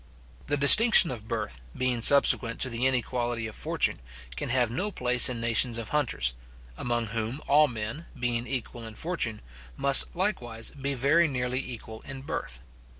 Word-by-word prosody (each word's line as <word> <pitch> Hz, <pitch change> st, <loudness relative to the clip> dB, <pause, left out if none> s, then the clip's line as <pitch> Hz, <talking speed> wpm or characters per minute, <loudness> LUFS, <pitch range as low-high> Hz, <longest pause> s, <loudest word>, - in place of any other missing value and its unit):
The 145 Hz, -, -1 dB
distinction 190 Hz, -, +8 dB
of 110 Hz, -3 st, -9 dB
birth, 60 Hz, -, -6 dB, 0.2 s
being 125 Hz, -2 st, -2 dB
subsequent 125 Hz, -3 st, +4 dB
to 130 Hz, -, +1 dB
the 120 Hz, +3 st, -2 dB
inequality 120 Hz, -2 st, -3 dB
of 110 Hz, -, -8 dB
fortune, -, -, -2 dB, 0.4 s
can -, -, -6 dB
have 120 Hz, -2 st, 0 dB
no 185 Hz, -, -3 dB
place 125 Hz, -6 st, +4 dB
in 120 Hz, -2 st, -6 dB
nations 115 Hz, +1 st, +1 dB
of 115 Hz, -2 st, -8 dB
hunters, 110 Hz, -, -2 dB, 0.4 s
among 120 Hz, -, -4 dB
whom 115 Hz, +4 st, -5 dB
all 150 Hz, +1 st, +3 dB
men, 120 Hz, +7 st, -8 dB
being 120 Hz, 0 st, -3 dB
equal 120 Hz, -2 st, -6 dB
in 110 Hz, -, -13 dB
fortune, 135 Hz, -11 st, -5 dB, 0.4 s
must 140 Hz, +4 st, +4 dB
likewise 120 Hz, -, -3 dB
be 140 Hz, 0 st, -5 dB
very 150 Hz, +7 st, +1 dB
nearly 125 Hz, -2 st, -4 dB
equal 115 Hz, -4 st, -7 dB
in 135 Hz, 0 st, -10 dB
birth. -, -, -6 dB
125 Hz, 160 wpm, -25 LUFS, 115-140 Hz, 0.4 s, distinction